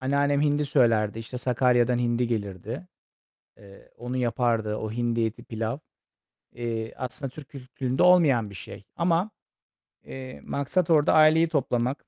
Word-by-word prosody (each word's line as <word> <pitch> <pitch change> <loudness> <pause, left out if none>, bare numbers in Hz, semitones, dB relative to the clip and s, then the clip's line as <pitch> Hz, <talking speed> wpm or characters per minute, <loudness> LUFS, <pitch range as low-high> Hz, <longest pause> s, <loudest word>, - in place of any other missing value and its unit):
anneannem 140 +2 +1
hindi 145 0 +1
söylerdi, 115 -6 +2
işte, 120 +2 -7
Sakarya'dan 125 -1 +2
hindi 120 0 0
gelirdi, 110 - -4 0.7
eee, 100 -1 -17
onu 125 +2 -5
yapardı. 115 -3 0
O 110 0 -5
hindi 115 -1 0
eti, 110 +1 -5
pilav. 115 +3 -4 0.8
Eee, 115 -2 -4
aslında 130 +1 -5
Türk 140 0 -12
kültüründe 130 0 -3
olmayan 150 - +4
bir 100 - -12
şey 95 - -10
ama, 170 +4 +1 0.7
eee, 130 -1 -9
maksat 160 +5 -1
orada 150 -3 +4
aileyi 155 +1 +5
toplamak. 130 -3 -1
125 Hz, 135 wpm, -26 LUFS, 115-145 Hz, 0.8 s, aileyi